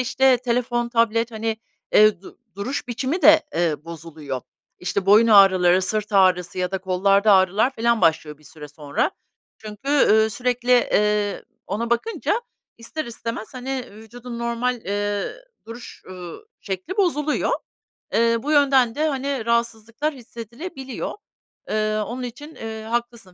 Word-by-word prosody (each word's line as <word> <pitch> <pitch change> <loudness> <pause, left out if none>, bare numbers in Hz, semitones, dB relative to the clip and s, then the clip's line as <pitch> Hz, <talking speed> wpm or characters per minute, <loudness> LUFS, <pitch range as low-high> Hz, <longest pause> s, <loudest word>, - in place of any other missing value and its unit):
işte, 260 +1 +3
telefon, 240 0 -1
tablet, 230 0 +1
hani, 220 0 -3 0.4
eee, 210 -3 +5
du - - -14 0.2
duruş 245 +7 -4
biçimi 260 +8 -2
de, 315 +2 +8
eee, 160 -3 0
bozuluyor. 155 -5 -7 0.4
İşte, 185 +2 -2
boyun 215 +3 +6
ağrıları, 190 -3 +6
sırt 210 +2 -2
ağrısı 185 -2 +3
ya 180 0 -1
da 190 - -2
kollarda 195 +3 +3
ağrılar 195 +6 +3
filan 235 0 +1
başlıyor 155 -2 +1
bir 155 - -23
süre 150 +1 -11
sonra. 145 -1 -2 0.5
Çünkü, 215 +4 -9
ııı, 220 -6 +4
sürekli, 250 +1 0
eee, 210 -4 +2 0.2
ona 230 +4 -3
bakınca 450 - 0 0.4
ister 235 +7 -5
istemez, 230 0 -6
hani, 255 0 -4
vücudun 235 +3 -10
normal, 235 +1 -1
eee, 205 +1 -2 0.3
duruş, 235 +2 -10
ııı, 180 - -9 0.2
şekli 195 - -5
bozuluyor. 305 -6 +1 0.6
Eee, 230 0 +3
bu 295 - -2
yönden 270 -5 +4
de, 310 +1 +1
hani, 270 -3 -3
rahatsızlıklar 235 +5 -1
hissedilebiliyor. 260 - -7 0.6
Eee, 215 0 0
onun 250 +2 -6
için, 290 +6 -8
eee, 220 -1 -7
haklısın, 235 -4 -4
225 Hz, 135 wpm, -22 LUFS, 195-250 Hz, 0.6 s, de